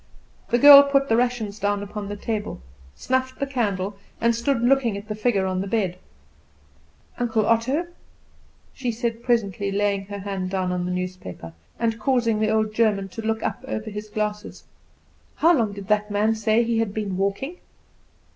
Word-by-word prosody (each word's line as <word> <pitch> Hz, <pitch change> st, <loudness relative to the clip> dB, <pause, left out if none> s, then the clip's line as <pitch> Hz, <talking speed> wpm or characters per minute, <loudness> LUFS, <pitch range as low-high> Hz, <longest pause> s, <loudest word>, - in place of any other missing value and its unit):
The 240 Hz, -, +3 dB
girl 280 Hz, +2 st, +11 dB
put 275 Hz, -1 st, +1 dB
the 225 Hz, -, +4 dB
rations 230 Hz, -4 st, -1 dB
down 205 Hz, 0 st, 0 dB
upon 205 Hz, 0 st, -6 dB
the 205 Hz, -, -4 dB
table, 210 Hz, -, -4 dB, 0.4 s
snuffed 260 Hz, 0 st, -1 dB
the 275 Hz, -, 0 dB
candle, 205 Hz, -7 st, -2 dB, 0.2 s
and 235 Hz, 0 st, +3 dB
stood 235 Hz, +1 st, 0 dB
looking 245 Hz, -4 st, +2 dB
at 205 Hz, +1 st, -9 dB
the 215 Hz, -, -3 dB
figure 210 Hz, -2 st, 0 dB
on 185 Hz, 0 st, -1 dB
the 195 Hz, -, -4 dB
bed. 190 Hz, -4 st, -1 dB, 1.2 s
"Uncle 225 Hz, -3 st, +1 dB
Otto," 255 Hz, +10 st, +1 dB, 0.9 s
she 250 Hz, -3 st, -2 dB
said 230 Hz, 0 st, -3 dB
presently, 205 Hz, -5 st, 0 dB
laying 200 Hz, 0 st, 0 dB
her 205 Hz, 0 st, -6 dB
hand 195 Hz, -2 st, -4 dB
down 185 Hz, -1 st, -1 dB
on 180 Hz, 0 st, -2 dB
the 180 Hz, -, -2 dB
newspaper, 180 Hz, -, -6 dB, 0.2 s
and 230 Hz, -1 st, -1 dB
causing 230 Hz, -2 st, +1 dB
the 215 Hz, 0 st, +1 dB
old 215 Hz, 0 st, +1 dB
German 210 Hz, -3 st, +1 dB
to 225 Hz, -, -7 dB
look 220 Hz, 0 st, -2 dB
up -, -, -3 dB
over 220 Hz, -4 st, -4 dB
his 210 Hz, +1 st, -7 dB
glasses, 210 Hz, 0 st, -4 dB, 0.7 s
"how 335 Hz, +2 st, +4 dB
long 225 Hz, -6 st, +1 dB
did 200 Hz, -1 st, -9 dB
that 210 Hz, 0 st, +1 dB
man 210 Hz, +2 st, +2 dB
say 220 Hz, +1 st, +2 dB
he 230 Hz, -1 st, 0 dB
had 220 Hz, -3 st, -1 dB
been 205 Hz, -3 st, -2 dB
walking?" 200 Hz, -, -2 dB
215 Hz, 175 wpm, -23 LUFS, 200-235 Hz, 1.2 s, girl